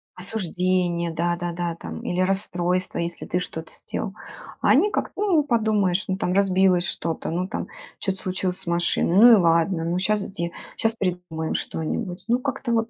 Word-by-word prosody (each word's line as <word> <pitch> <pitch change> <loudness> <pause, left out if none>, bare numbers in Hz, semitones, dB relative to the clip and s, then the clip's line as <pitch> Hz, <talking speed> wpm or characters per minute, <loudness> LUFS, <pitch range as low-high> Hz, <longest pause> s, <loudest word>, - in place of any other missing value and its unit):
Осуждение, 180 -3 0
да-да-да 175 0 -1
там 80 - -7
или 180 - -2
расстройство, 185 -1 0
если 170 0 -3
ты 180 - -1
что-то 160 -2 -6
сделал. 195 - -5 0.5
А - - +2
они 360 +10 +5
как-то: - - -2
ну 355 -8 +3
подумаешь, 215 -7 +1
ну 190 - 0
там 180 -1 -1
разбилось 190 -2 +3
что-то, 165 -2 -3
ну 180 +3 -1
там - - -4 0.3
что-то 190 -1 -2
случилось 185 -1 -2
с - - -11
машиной, 170 0 +1
ну 235 +5 +9
и 230 - +10
ладно, 165 -1 +2
ну 175 +2 0
щас 210 +2 +1
сде 170 -2 -4 0.2
щас 225 0 +1
придумаем 180 -5 -2
что-нибудь. 175 +3 -3
Ну 240 +1 +2
как-то 265 -2 -2
вот 225 0 +1
180 Hz, 170 wpm, -24 LUFS, 170-205 Hz, 0.5 s, и